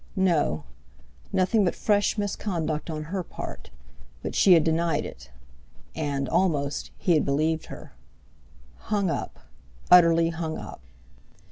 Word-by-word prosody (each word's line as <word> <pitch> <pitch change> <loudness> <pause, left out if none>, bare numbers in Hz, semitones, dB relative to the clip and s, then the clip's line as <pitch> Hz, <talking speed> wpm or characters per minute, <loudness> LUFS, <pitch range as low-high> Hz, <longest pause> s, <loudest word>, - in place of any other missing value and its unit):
No! 165 - +1 0.7
Nothing 200 +3 +2
but 180 - 0
fresh 205 +1 +1
misconduct 175 -6 -2
on 155 -1 -4
her 185 +5 -3
part—but - - -10
she 190 - +6
had 165 -3 +5
denied 160 -1 0
it; 70 - -10 0.6
and—almost—he 145 +2 -1
had 155 - +3
believed 155 +3 0
her. - - -11 0.8
Hung 200 -5 -1
up! - - -4 0.5
Utterly 170 -2 +6
hung 160 -1 -4
up! - - -9
165 Hz, 110 wpm, -26 LUFS, 150-185 Hz, 0.8 s, she